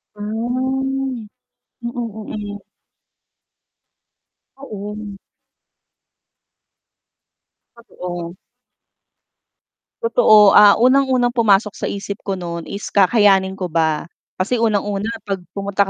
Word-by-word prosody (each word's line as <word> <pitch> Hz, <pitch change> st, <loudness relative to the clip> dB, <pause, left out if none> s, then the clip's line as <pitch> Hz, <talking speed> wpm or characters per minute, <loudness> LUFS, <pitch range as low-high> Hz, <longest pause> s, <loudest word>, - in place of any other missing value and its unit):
Ah, -, -, -18 dB
mm, 255 Hz, +2 st, -2 dB, 0.5 s
mm. 215 Hz, -3 st, -6 dB, 1.9 s
Oo. 210 Hz, -5 st, -8 dB, 2.6 s
Totoo. 175 Hz, -6 st, -8 dB, 1.6 s
Totoo, 215 Hz, -, +5 dB
ah, 205 Hz, -1 st, +7 dB
unang 265 Hz, +3 st, +3 dB
unang 245 Hz, -2 st, +1 dB
pumasok 210 Hz, -4 st, +3 dB
sa -, -, -4 dB
isip 200 Hz, 0 st, -6 dB
ko 195 Hz, -1 st, -3 dB
nun 170 Hz, -2 st, -6 dB
is 200 Hz, 0 st, -6 dB
kakayanin 195 Hz, -1 st, +3 dB
ko 185 Hz, -, -3 dB
ba. 160 Hz, -2 st, 0 dB, 0.3 s
Kasi 225 Hz, +6 st, -1 dB
unang-una 205 Hz, -1 st, 0 dB, 0.2 s
'pag 195 Hz, -3 st, -3 dB, 0.2 s
pumunta 200 Hz, 0 st, -1 dB
210 Hz, 85 wpm, -19 LUFS, 195-240 Hz, 2.6 s, ah